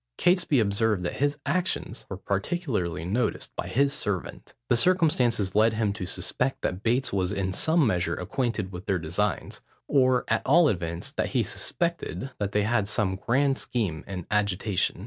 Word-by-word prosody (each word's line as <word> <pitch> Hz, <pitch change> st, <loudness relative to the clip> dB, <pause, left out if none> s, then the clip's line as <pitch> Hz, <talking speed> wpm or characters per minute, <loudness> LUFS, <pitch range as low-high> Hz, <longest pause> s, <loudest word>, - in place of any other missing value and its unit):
Catesby 175 Hz, -6 st, +3 dB
observed 105 Hz, -2 st, +1 dB
that 85 Hz, -, -3 dB
his 145 Hz, +1 st, +1 dB
actions 170 Hz, -6 st, -2 dB
were 95 Hz, -, -5 dB
particularly 100 Hz, -, -2 dB
noticed 110 Hz, +8 st, -1 dB
by -, -, -4 dB
his 140 Hz, +2 st, +2 dB
servant. 100 Hz, -8 st, -4 dB
The 120 Hz, -, +3 dB
circumstance 125 Hz, -, +2 dB
led 110 Hz, +2 st, +4 dB
him 110 Hz, -2 st, 0 dB
to 95 Hz, -3 st, -5 dB
suspect, 125 Hz, +7 st, -2 dB
that 90 Hz, +1 st, -2 dB
Bates 120 Hz, +3 st, +1 dB
was 95 Hz, -1 st, 0 dB
in 95 Hz, -2 st, -1 dB
some 160 Hz, -, +3 dB
measure 90 Hz, -6 st, +1 dB
acquainted 110 Hz, -1 st, -2 dB
with 90 Hz, +2 st, -8 dB
their 95 Hz, -, +2 dB
designs, 90 Hz, +4 st, -2 dB, 0.3 s
or 130 Hz, -2 st, +3 dB
at 110 Hz, -, +1 dB
all 160 Hz, +3 st, +5 dB
events, 85 Hz, -4 st, -3 dB
that -, -, -1 dB
he -, -, +3 dB
suspected 170 Hz, -5 st, -2 dB
that 100 Hz, -1 st, -1 dB
they 105 Hz, 0 st, +2 dB
had 105 Hz, -2 st, +1 dB
some 100 Hz, -2 st, 0 dB
grand 135 Hz, +7 st, +1 dB
scheme 95 Hz, -11 st, -2 dB
in 90 Hz, -3 st, -5 dB
agitation. 100 Hz, -3 st, +1 dB
105 Hz, 165 wpm, -27 LUFS, 95-135 Hz, 0.3 s, all